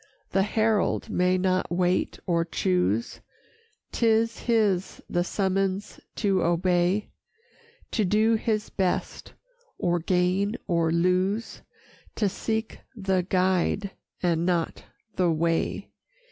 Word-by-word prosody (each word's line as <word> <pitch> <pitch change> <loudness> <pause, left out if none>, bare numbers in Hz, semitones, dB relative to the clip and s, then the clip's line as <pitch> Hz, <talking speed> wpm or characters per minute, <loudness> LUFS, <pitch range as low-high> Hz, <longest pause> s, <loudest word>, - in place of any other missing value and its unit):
The 195 - +3
herald 215 +1 +1
may 180 +1 +2
not 185 0 0
wait 180 +1 +1
or 170 -3 +1
choose, 95 - 0 0.7
'Tis 225 0 +2
his 210 -6 +1
the 175 - 0
summons 195 +1 -1 0.2
to 195 -4 +1
obey; 175 +3 +1 0.8
To 220 - +1
do 215 +4 +3
his 215 -1 -1
best, 185 -2 -2 0.4
or 175 0 +1
gain 185 +5 +1
or 165 -2 +1
lose, 185 +6 0 0.5
To 210 - +1
seek 220 +3 -3 0.2
the 190 -3 0
Guide 185 +1 +1 0.3
and 170 -2 +2
not 175 -2 -1 0.3
the 180 -2 +3
way. 165 +1 -1
185 Hz, 105 wpm, -26 LUFS, 175-205 Hz, 0.8 s, The